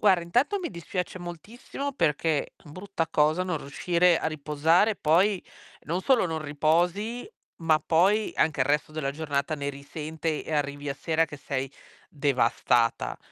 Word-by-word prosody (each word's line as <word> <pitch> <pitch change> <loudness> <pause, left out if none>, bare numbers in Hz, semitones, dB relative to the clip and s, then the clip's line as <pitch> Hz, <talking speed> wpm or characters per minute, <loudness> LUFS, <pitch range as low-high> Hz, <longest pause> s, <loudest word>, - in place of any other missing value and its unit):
Guarda 190 -4 +4
intanto 245 - +1
mi 355 - -4
dispiace 180 +1 -4
moltissimo 215 - -6
perché 155 - 0
brutta 165 +2 -4
cosa 155 +3 +2
non 180 -4 -2
riuscire 170 +5 +2
a 160 - -1
riposare 155 +7 +2
poi 185 +4 +2 0.4
non 170 +5 -2
solo 255 -2 +3
non 160 -3 -2
riposi, 175 - 0 0.3
ma 160 -1 +3
poi 195 +6 +3
anche 155 -3 +1
il 130 - +3
resto 150 +2 0
della 155 -3 -2
giornata 145 0 -2
ne 140 0 -3
risente 155 +2 -4
e - - -6
arrivi 145 -1 -2
a 140 - -2
sera 160 +2 +1
che 150 -2 -9
sei 135 -1 -3 0.4
devastata. 125 -4 +1
160 Hz, 150 wpm, -27 LUFS, 145-180 Hz, 0.4 s, Guarda